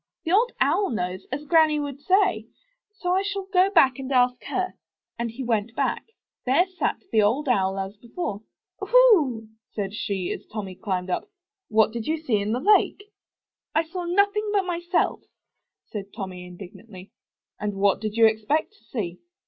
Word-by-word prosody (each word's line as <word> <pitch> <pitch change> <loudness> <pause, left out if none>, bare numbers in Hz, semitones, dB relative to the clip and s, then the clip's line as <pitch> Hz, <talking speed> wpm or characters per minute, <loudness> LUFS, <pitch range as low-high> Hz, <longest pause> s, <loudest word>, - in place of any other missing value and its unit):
The 325 - -2
Old 460 +6 +4
Owl 335 +9 +2
knows, 185 -4 -3
as 290 +3 -4
Granny 315 -1 +4
would 285 -1 -5
say; 375 +3 +2 0.4
so 360 -4 -3
I 375 +1 +3
shall 400 -1 -3
go 370 +1 +5
back 270 -9 +4
and 265 0 -5
ask 250 -1 +2
her." 370 -1 -2 0.5
And 235 0 -1
back 225 - -12
he 265 - -4
went. 225 -2 0 0.7
There 270 +8 +3
sat 370 -1 -3
the 220 - +4
Old 245 +9 +1
Owl 195 -6 +2
as 195 +1 -4
before. 225 - -5 0.4
0ohoo!" 325 - +4 0.2
said 200 -2 -3
she, 195 -4 -2
as - - -5
Tommy 205 -4 -5
climbed 185 -1 -3
up. 405 - -2 0.4
'What 220 0 +4
did 230 -1 -5
you 320 - +1
see 260 -9 0
in 205 +1 -1
the 240 - 0
lake?" 410 +3 +2 0.6
*'I 320 - +4
saw 355 0 -4
nothing 405 +4 +2
but 400 -2 +2
myself," 345 0 0 0.7
said 205 -2 -4
Tommy, 185 -3 -6
indig 180 +1 -10
nantly. 190 -4 -13 0.5
''And 205 -1 -2
what 200 +1 +2
did 215 -1 -3
you 230 - +7
expect 220 - +1
to 415 - -27
see?" 180 -8 -5
255 Hz, 175 wpm, -25 LUFS, -, 0.7 s, you